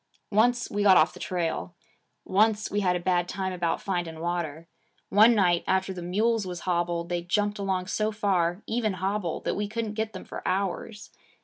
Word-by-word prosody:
Once 245 +4 +3
we 205 - -1
got 195 -2 +7
off 155 - +4
the - - -12
trail. 175 0 -3 0.5
Once 215 +2 +2
we 205 - +1
had 180 -3 +2
a - - -1
bad 175 0 0
time 190 -1 -3
about 175 -2 -1
finding 175 -4 -3
water. 165 -2 -3 0.4
One 220 +4 +6
night, 175 -4 +3
after 190 0 +1
the 180 - -7
mules 210 +4 0
was 175 -1 -5
hobbled 175 -1 -1
they 175 -1 -1
jumped 205 +4 0
along 190 -2 -1
so 215 +3 -1
far, 190 -3 0
even 220 -3 0
hobbled, 190 -2 -2
that - - +1
we 205 0 -2
couldn't 220 0 -3
get 220 0 -2
them 185 - -8
for - - -7
hours. 200 +2 -3
190 Hz, 190 wpm, -27 LUFS, 175-210 Hz, 0.5 s, got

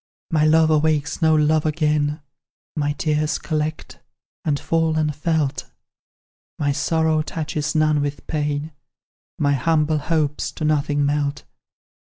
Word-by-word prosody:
"My 155 -2 +3
love 160 0 +4
awakes 155 0 +1
no 160 -1 +4
love 155 0 +3
again, 150 -1 0 0.5
My 145 -1 0
tears 150 0 0
collect, 155 -1 -4 0.4
and 145 -3 0
fall 165 -1 0
unfelt; 150 -1 -1 0.9
My 145 -2 0
sorrow 160 +2 +1
touches 155 -1 -3
none 155 -1 +3
with 145 0 -4
pain, 150 0 -2 0.7
My 145 -1 +2
humble 155 +1 +1
hopes 150 -1 -1
to 155 - -4
nothing 145 -1 +1
melt. 145 0 -1
155 Hz, 120 wpm, -22 LUFS, 145-155 Hz, 0.9 s, love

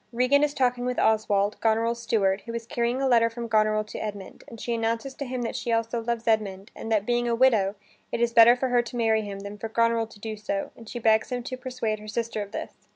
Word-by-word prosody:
Regan 255 +4 +3
is 295 0 0
talking 250 -2 +1
with 250 0 -2
Oswald, 210 -2 +2
Goneril's 230 +1 +1
steward, 195 -4 +1
who 230 - -5
is 230 -1 -4
carrying 240 0 -1
a 270 - +1
letter 230 -2 +4
from 235 0 -6
Goneril 215 -1 +2
to 215 - -8
Edmund, 205 -3 -7
and 230 - -11
she 235 - -2
announces 230 +3 -1
to 280 - -6
him 250 -1 -3
that 230 - -3
she 235 - -3
also 230 +1 0
loves 235 0 -3
Edmund 205 -3 0
and 225 - -6
that, 210 -2 +2
being 240 0 +1
a 235 - +1
widow, 225 -6 +3 0.4
it - - -2
is 235 0 +1
better 230 +1 +8
for 255 +1 -1
her 245 -1 +4
to 240 +1 -9
marry 220 -2 +2
him 200 -2 -6
than 200 +1 -8
for 225 - -5
Goneril 230 0 +2
to 220 - -16
do 220 +1 -5
so, 200 -1 -3
and 230 -1 -13
she - - -6
begs 220 0 +2
him 245 -1 -2
to 255 +1 -5
persuade 250 -4 -3
her 215 - -11
sister 225 0 -3
of 200 -1 -7
this. - - -8
230 Hz, 255 wpm, -26 LUFS, 215-240 Hz, 0.4 s, better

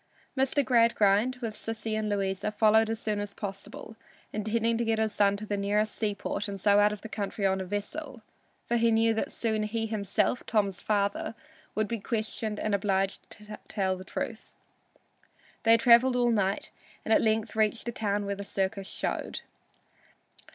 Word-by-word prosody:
Mr. 270 +1 +2
Gradgrind, 230 -1 +4
with 225 -2 -2
Sissy 225 0 -4
and 215 -1 -1
Louisa, 200 0 -1
followed 220 +1 +4
as 225 -1 -2
soon 210 -2 -1
as 205 -1 -5
possible, 200 +2 -7 0.4
intending 225 +2 0
to - - +1
get 225 -1 +1
his 220 -1 0
son 200 -1 +3
to 215 - -6
the 205 - -2
nearest 205 +2 0
seaport 205 0 -2
and 200 -1 -5
so 205 +2 +4
out 205 0 +5
of 210 -1 -7
the - - -5
country 205 -1 -3
on 190 0 +2
a - - -4
vessel, 220 - -5 0.4
for 240 - +1
he 230 0 +3
knew 225 0 +3
that 220 - -2
soon 220 -2 -1
he 225 +1 -1
himself, 215 +2 0
Tom's 200 -4 +1
father, 200 +1 0 0.4
would 215 0 +1
be 230 0 -3
questioned 215 0 -3
and 215 - -1
obliged 195 -1 0
to 210 0 -9
tell 190 -2 0
the 185 - -9
truth. 225 +3 -6 1.1
They 230 0 +6
traveled 245 +2 +6
all 240 -1 +3
night, 200 -3 0 0.3
and 220 - +3
at - - +5
length 220 0 0
reached 220 +1 +1
the 235 - -2
town 205 -2 -1
where 200 - -1
the 200 0 -6
circus 195 0 -2
showed. - - -3
215 Hz, 180 wpm, -29 LUFS, 200-225 Hz, 1.1 s, They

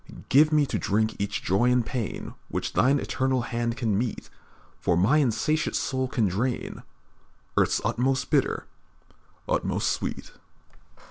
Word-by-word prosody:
"Give 150 +3 +6
me 150 -1 +4
to - - -2
drink 110 +2 0
each 100 +1 -2
joy 105 +7 +2
and 125 -2 +2
pain 120 -6 -4
Which - - -3
Thine 135 +4 +4
eternal 130 -2 0
hand 120 0 -2
can 110 -5 0
mete, 120 -1 -4 0.5
For 85 - +1
my 105 - +4
insatiate 150 +3 +1
soul 130 -1 -1
can 115 -4 +1
drain 115 +7 -2 0.7
Earth's - - +2
utmost 130 +2 0
bitter, - - +1 0.8
utmost - - 0
sweet. - - -4
125 Hz, 135 wpm, -26 LUFS, 110-130 Hz, 0.8 s, Give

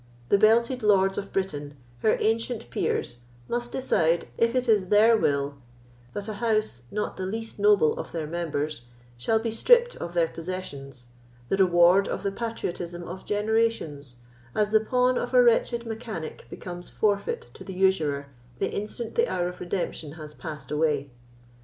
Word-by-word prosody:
The - - +5
belted 235 +4 +4
lords 195 -2 +4
of 200 - -7
Britain, 145 -7 -3 0.2
her 215 - +3
ancient 225 - -1
peers, 120 - -1 0.3
must 240 0 -2
decide, 170 -10 +1
if 230 +1 +2
it 255 -1 +1
is 205 -5 +3
their 220 +3 +6
will 140 -7 0 0.6
that 205 0 -4
a 215 - -3
house, 215 - 0
not 210 0 -3
the 185 - -3
least 225 +2 -5
noble 200 -6 +5
of - - -6
their 165 -2 -3
members, 155 -4 -3 0.3
shall 120 - +1
be 225 0 -2
stripped 480 - +4
of 170 +1 -6
their 170 -1 +3
possessions, 145 -8 -7 0.4
the 195 - +1
reward 180 +1 +5
of - - -3
the 200 - 0
patriotism 175 -6 -4
of 180 +2 -8
generations, 210 - 0 0.4
as 210 -1 +1
the 220 - +6
pawn 250 +3 +2
of - - -3
a - - +8
wretched 470 - +2
mechanic 220 -7 -6
becomes 175 -1 -8
forfeit 200 - -1
to - - -11
the 190 - -7
usurer 160 -7 +2 0.3
the - - -1
instant 215 +3 -4
the 470 +1 +2
hour 175 0 -1
of 180 - -10
redemption 175 -4 -3
has 155 -2 -9
passed 150 -4 -8
away. 150 -3 0
195 Hz, 165 wpm, -26 LUFS, 160-225 Hz, 0.6 s, a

